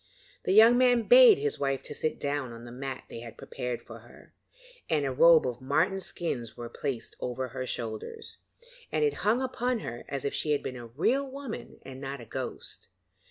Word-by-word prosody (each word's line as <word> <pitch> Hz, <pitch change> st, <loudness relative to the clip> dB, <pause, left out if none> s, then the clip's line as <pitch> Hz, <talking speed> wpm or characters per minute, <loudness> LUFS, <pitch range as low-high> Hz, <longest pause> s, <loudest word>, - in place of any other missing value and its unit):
The -, -, +1 dB
young 225 Hz, +4 st, +7 dB
man 245 Hz, -2 st, +4 dB
bade -, -, +9 dB
his 435 Hz, 0 st, -1 dB
wife 135 Hz, -1 st, -1 dB
sit 155 Hz, -, -3 dB
down 140 Hz, -3 st, -2 dB
on 115 Hz, +1 st, -10 dB
the 120 Hz, -, -9 dB
mat 130 Hz, +1 st, -6 dB
they -, -, -8 dB
had 115 Hz, -1 st, -10 dB
prepared 125 Hz, -1 st, -5 dB
for -, -, -11 dB
her, -, -, -18 dB, 0.6 s
and 150 Hz, -3 st, +1 dB
a 135 Hz, -, 0 dB
robe 160 Hz, +4 st, +6 dB
of 125 Hz, 0 st, -3 dB
marten 160 Hz, +9 st, +1 dB
skins 135 Hz, -11 st, -3 dB
was 120 Hz, -1 st, -7 dB
placed 135 Hz, -5 st, -4 dB
over 125 Hz, +1 st, -3 dB
her 130 Hz, +1 st, -5 dB
shoulders, 115 Hz, -, -6 dB, 0.5 s
and -, -, +1 dB
it 440 Hz, -1 st, +2 dB
hung 230 Hz, +5 st, +2 dB
upon 250 Hz, -2 st, -1 dB
her 120 Hz, +1 st, -6 dB
as 140 Hz, -1 st, -3 dB
if 140 Hz, -, -1 dB
she 150 Hz, -, +1 dB
had 145 Hz, -, -1 dB
been 130 Hz, -, -4 dB
a 120 Hz, -1 st, -8 dB
real 245 Hz, -, 0 dB
woman 270 Hz, -3 st, -7 dB
and 135 Hz, 0 st, -9 dB
not 140 Hz, 0 st, -5 dB
a 120 Hz, -, -10 dB
ghost. -, -, -6 dB
140 Hz, 200 wpm, -29 LUFS, -, 0.6 s, bade